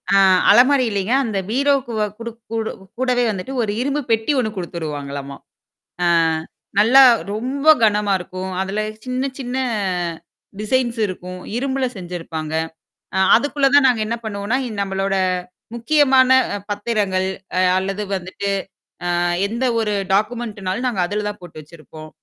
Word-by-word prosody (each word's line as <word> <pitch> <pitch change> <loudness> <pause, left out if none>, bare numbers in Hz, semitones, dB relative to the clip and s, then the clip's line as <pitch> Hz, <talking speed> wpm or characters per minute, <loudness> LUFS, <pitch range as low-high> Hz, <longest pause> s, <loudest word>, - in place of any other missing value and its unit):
ஆ - - +6 0.3
அலமாரி 260 +2 +5
இல்லீங்க. 200 +2 -1
அந்த 220 -5 -2
பீரோக்கு 275 +1 +1
வ - - +2
குடுக் 230 0 -8
கூடு 225 -1 -2 0.3
கூடவே 250 -1 +2
வந்துட்டு 205 +5 -4
ஒரு 215 -3 -1
இரும்பு 280 +3 -1
பெட்டி 225 +5 +2
ஒண்ணு 230 -4 0
குடுத்துருவாங்களம்மா. 145 -5 -5 0.7
ஆ - - +3 0.7
நல்லா 240 +6 +7 0.3
ரொம்ப 260 +7 -3 0.2
கனமா 210 -1 +2
இருக்கும். 185 +1 -6
அதுல 195 +2 -2 0.2
சின்ன 255 +2 -2
சின்ன, 250 -1 -4 1.0
டிசைன்ஸ் 240 +2 0
இருக்கும். 185 -1 -7 0.2
இரும்பல 265 0 -1
செஞ்சருப்பாங்க. 165 -3 -6 0.6
அ - - +1 0.2
அதுக்குள்ள 285 +3 +2
தான் 285 -1 +6
நாங்க 240 -4 +2
என்ன 230 - -1
பண்ணுவோம்னா, 210 +2 -2
அ - - -6
நம்மளோட 195 0 -1 0.6
முக்கியமான 260 +1 +4 0.4
பத்திரங்கள் 205 -3 -1 0.3
அ - - +3 0.2
அல்லது 195 +2 -3
வந்துட்டு 190 +2 -4 0.5
அ - - -1 0.4
எந்த 235 +5 -2
ஒரு 215 -2 0 0.2
டாக்குமெண்ட்னாலும் 215 0 -1
நாங்க 200 -7 -2
அதுல 210 +2 -3
தான் 205 0 -8
போட்டு 175 -3 -11
வச்சிருப்போம். 155 0 -13
215 Hz, 130 wpm, -20 LUFS, 190-250 Hz, 1.0 s, நல்லா